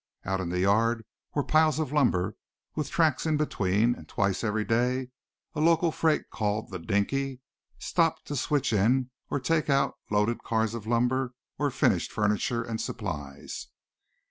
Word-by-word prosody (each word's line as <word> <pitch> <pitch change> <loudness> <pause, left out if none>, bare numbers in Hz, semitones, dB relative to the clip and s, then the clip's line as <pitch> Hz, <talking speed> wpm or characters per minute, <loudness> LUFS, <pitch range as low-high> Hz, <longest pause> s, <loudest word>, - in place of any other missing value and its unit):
Out 95 0 -1
in 90 - -3
the 90 +1 0
yard 110 +4 +2 0.3
were 145 - +2
piles 155 -1 +3
of 155 -4 -1
lumber, 105 -9 +2 0.4
with 150 -3 -2
tracks 160 -2 +2
in 155 -1 +2
between, 110 -5 +2
and - - -12
twice 100 0 0
every 105 -1 0
day 125 +2 +1 0.4
a 150 - -4
local 165 +1 +4
freight 160 0 +1
called 105 -1 -2
"The 95 - -4
Dinky" 125 +9 -1 0.4
stopped 165 -2 +1
to 145 - -4
switch 140 -2 +1
in 125 +5 +2 0.2
or - - 0
take 155 +4 +1
out 140 0 +2
loaded 105 +3 +1
cars 110 -1 0
of 110 -2 -6
lumber 125 +2 +1 0.2
or 145 -1 +2
finished - - +1
furniture 105 +3 0
and 115 -1 -4
supplies. 75 -10 -5
120 Hz, 160 wpm, -28 LUFS, 105-145 Hz, 0.4 s, local